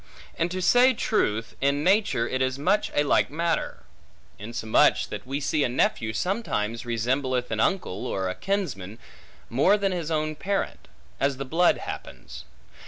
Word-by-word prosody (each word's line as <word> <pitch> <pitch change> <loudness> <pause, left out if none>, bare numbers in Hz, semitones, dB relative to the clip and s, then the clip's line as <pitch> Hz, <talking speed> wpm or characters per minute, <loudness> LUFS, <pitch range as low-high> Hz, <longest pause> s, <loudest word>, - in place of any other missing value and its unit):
And, 170 - 0
to 185 +1 -3
say 250 +4 +5
truth, 115 - 0
in 140 +2 +1
nature 190 - +2
it 130 - -2
is 130 0 0
much 185 +9 +1
a 145 - +3
like 145 - +2
matter; 165 +2 -2 0.6
insomuch 110 +1 +2
that - - -7
we 135 +2 -2
see 150 +1 0
a - - +1
nephew 115 -2 0
sometimes 115 - -2
resembleth 125 +2 -1
an 110 - -1
uncle, 115 - 0
or 95 -1 -2
a 90 - -2
kinsman, 115 - -3 0.5
more 165 - +3
than 200 -1 0
his 170 -4 -3
own 155 -1 -1
parent; 195 +5 -3 0.3
as 140 -1 +1
the 135 - -4
blood 170 +6 +3
happens. - - -8
140 Hz, 160 wpm, -26 LUFS, 115-180 Hz, 0.6 s, say